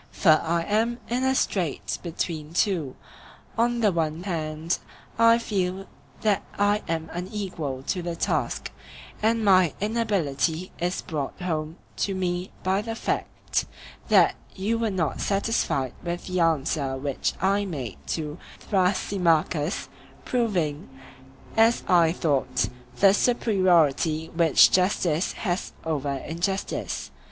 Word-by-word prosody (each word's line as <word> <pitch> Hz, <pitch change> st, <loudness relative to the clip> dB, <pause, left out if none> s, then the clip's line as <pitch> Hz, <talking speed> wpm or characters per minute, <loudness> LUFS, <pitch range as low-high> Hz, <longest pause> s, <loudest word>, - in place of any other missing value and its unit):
For 155 Hz, -4 st, +4 dB
I 170 Hz, +1 st, 0 dB
am 225 Hz, +5 st, +1 dB
in 245 Hz, +2 st, 0 dB
a 265 Hz, 0 st, +2 dB
strait 180 Hz, -, -1 dB
between 160 Hz, -2 st, -4 dB
two; 170 Hz, -10 st, +1 dB, 0.6 s
on 240 Hz, +1 st, +1 dB
the 210 Hz, -3 st, +4 dB
one 165 Hz, -1 st, -1 dB
hand 160 Hz, -2 st, -2 dB, 0.4 s
I 230 Hz, 0 st, +7 dB
feel 195 Hz, -4 st, -2 dB, 0.4 s
that 210 Hz, -3 st, +2 dB, 0.2 s
I 205 Hz, +1 st, +2 dB
am 160 Hz, -1 st, -2 dB
unequal 175 Hz, -8 st, -4 dB
to 180 Hz, +5 st, -2 dB
the 170 Hz, -1 st, -3 dB
task; -, -, -1 dB, 0.5 s
and 225 Hz, 0 st, +2 dB
my 185 Hz, -5 st, +5 dB
inability 185 Hz, -, 0 dB
is 175 Hz, +2 st, -1 dB
brought 150 Hz, -1 st, -4 dB
home 160 Hz, -2 st, -3 dB, 0.2 s
to 195 Hz, -, 0 dB
me 180 Hz, -1 st, -2 dB
by 190 Hz, +2 st, +1 dB
the 225 Hz, +1 st, -4 dB
fact -, -, -2 dB, 0.4 s
that -, -, +6 dB, 0.2 s
you 215 Hz, +4 st, -1 dB
were 230 Hz, -1 st, +1 dB
not 180 Hz, -6 st, -1 dB
satisfied 195 Hz, -, 0 dB
with 175 Hz, 0 st, -4 dB
the 185 Hz, -1 st, -2 dB
answer 150 Hz, -4 st, +1 dB
which 140 Hz, 0 st, -1 dB
I 200 Hz, +2 st, +2 dB
made 135 Hz, -, -5 dB
to 155 Hz, +1 st, -3 dB, 0.2 s
Thrasymachus, 180 Hz, -4 st, +1 dB, 0.4 s
proving, 180 Hz, -, -1 dB, 0.7 s
as 225 Hz, +1 st, +4 dB
I 170 Hz, -3 st, +5 dB
thought, 140 Hz, -7 st, 0 dB, 0.3 s
the 195 Hz, -1 st, +6 dB
superiority 175 Hz, -, +2 dB
which 165 Hz, -3 st, +6 dB
justice 180 Hz, -3 st, +2 dB
has 180 Hz, -3 st, -3 dB
over 145 Hz, -3 st, -1 dB
injustice. 170 Hz, +8 st, -3 dB
180 Hz, 125 wpm, -25 LUFS, 160-205 Hz, 0.7 s, I